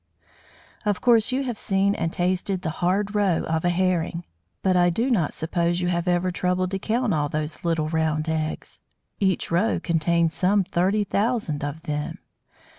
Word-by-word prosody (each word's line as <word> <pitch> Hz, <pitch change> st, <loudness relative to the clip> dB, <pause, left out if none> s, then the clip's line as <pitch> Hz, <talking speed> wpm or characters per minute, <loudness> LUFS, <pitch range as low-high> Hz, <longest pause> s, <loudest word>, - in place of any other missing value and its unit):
Of 205 Hz, -3 st, 0 dB
course 230 Hz, -2 st, +4 dB
you 265 Hz, +2 st, 0 dB
have 245 Hz, -5 st, -4 dB
seen 195 Hz, +1 st, +1 dB
and 165 Hz, -4 st, -2 dB
tasted 185 Hz, +2 st, -1 dB
the 160 Hz, -, -1 dB
"hard" 200 Hz, +4 st, +1 dB
roe 200 Hz, -5 st, +2 dB
of 160 Hz, 0 st, -1 dB
a 175 Hz, -, +2 dB
Herring; 175 Hz, -1 st, 0 dB, 0.4 s
but 185 Hz, -1 st, +3 dB
I 175 Hz, 0 st, +4 dB
do 230 Hz, +9 st, 0 dB
not 175 Hz, -10 st, +2 dB
suppose 170 Hz, +2 st, -1 dB
you 175 Hz, 0 st, 0 dB
have 175 Hz, 0 st, -1 dB
ever 180 Hz, +1 st, +1 dB
troubled 180 Hz, +1 st, 0 dB
to 195 Hz, -, -2 dB
count 230 Hz, +1 st, 0 dB
all 145 Hz, -2 st, 0 dB
those 150 Hz, -2 st, -4 dB
little 165 Hz, -2 st, 0 dB
round 160 Hz, -1 st, 0 dB
eggs. 155 Hz, -1 st, -3 dB, 0.4 s
Each 190 Hz, -4 st, 0 dB
roe 180 Hz, +7 st, +2 dB
contains 170 Hz, 0 st, +1 dB
some 195 Hz, +2 st, +2 dB
thirty 190 Hz, +4 st, +1 dB
thousand 205 Hz, -, -1 dB
of 145 Hz, +3 st, -5 dB
them! 150 Hz, 0 st, -3 dB
180 Hz, 175 wpm, -24 LUFS, 165-200 Hz, 0.4 s, course